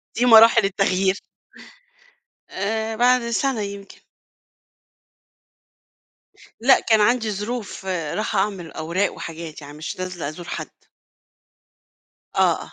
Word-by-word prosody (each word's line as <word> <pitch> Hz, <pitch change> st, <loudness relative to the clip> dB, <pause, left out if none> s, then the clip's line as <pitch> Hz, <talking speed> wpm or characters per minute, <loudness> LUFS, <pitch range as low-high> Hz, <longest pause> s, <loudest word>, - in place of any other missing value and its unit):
دي 245 Hz, -, +1 dB
مراحل 230 Hz, -1 st, +7 dB
التغيير. 195 Hz, 0 st, +1 dB, 1.3 s
آآ 220 Hz, +3 st, -3 dB
بعد 245 Hz, 0 st, +3 dB
سنة 255 Hz, -1 st, 0 dB
يمكن. 200 Hz, 0 st, -8 dB, 2.6 s
لأ 265 Hz, +3 st, +5 dB
كان 220 Hz, -2 st, +3 dB
عندي 225 Hz, +1 st, +2 dB
ظروف، 210 Hz, 0 st, -5 dB
رايحة 190 Hz, +4 st, -2 dB
أعمل 190 Hz, -4 st, -2 dB
أوراق 170 Hz, +5 st, -1 dB
وحاجات 165 Hz, -1 st, -8 dB
يعني 145 Hz, +1 st, -11 dB
مش 160 Hz, +3 st, -6 dB
نازلة 180 Hz, -5 st, -4 dB
أزور 170 Hz, +3 st, -9 dB
حد. -, -, -5 dB, 1.7 s
آه، -, -, +2 dB
آه. -, -, -13 dB
200 Hz, 105 wpm, -22 LUFS, 180-225 Hz, 2.6 s, مراحل